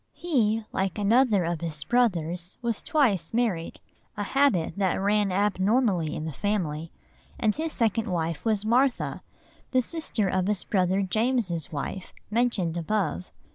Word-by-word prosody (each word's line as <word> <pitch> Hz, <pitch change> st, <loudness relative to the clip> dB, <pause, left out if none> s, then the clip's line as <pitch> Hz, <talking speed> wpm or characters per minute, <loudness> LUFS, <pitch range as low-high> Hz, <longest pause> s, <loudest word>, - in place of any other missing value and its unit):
He, 225 Hz, -10 st, 0 dB
like 190 Hz, 0 st, -1 dB
another 215 Hz, -1 st, +3 dB
of 170 Hz, -1 st, -2 dB
his 155 Hz, -3 st, -4 dB
brothers, 180 Hz, -7 st, 0 dB
was 230 Hz, -3 st, -1 dB
twice 255 Hz, -, +1 dB
married,—a 205 Hz, -2 st, -3 dB
habit 240 Hz, -, +2 dB
that 190 Hz, -3 st, +1 dB
ran 205 Hz, 0 st, +2 dB
abnormally 195 Hz, -, +1 dB
in 155 Hz, -, -4 dB
the 160 Hz, -, -3 dB
family,—and 185 Hz, -, -3 dB
his 320 Hz, +1 st, -2 dB
second 225 Hz, -2 st, 0 dB
wife 165 Hz, -3 st, -2 dB
was 215 Hz, -2 st, 0 dB
Martha, 250 Hz, +4 st, +1 dB, 0.5 s
the 255 Hz, -, +3 dB
sister 310 Hz, -, -1 dB
of 185 Hz, 0 st, 0 dB
his 210 Hz, -3 st, 0 dB
brother 190 Hz, 0 st, +1 dB
James's 215 Hz, -, 0 dB
wife, 160 Hz, +5 st, -5 dB, 0.2 s
mentioned 210 Hz, -8 st, +1 dB
above. 170 Hz, -, -1 dB
205 Hz, 135 wpm, -26 LUFS, 175-230 Hz, 0.5 s, another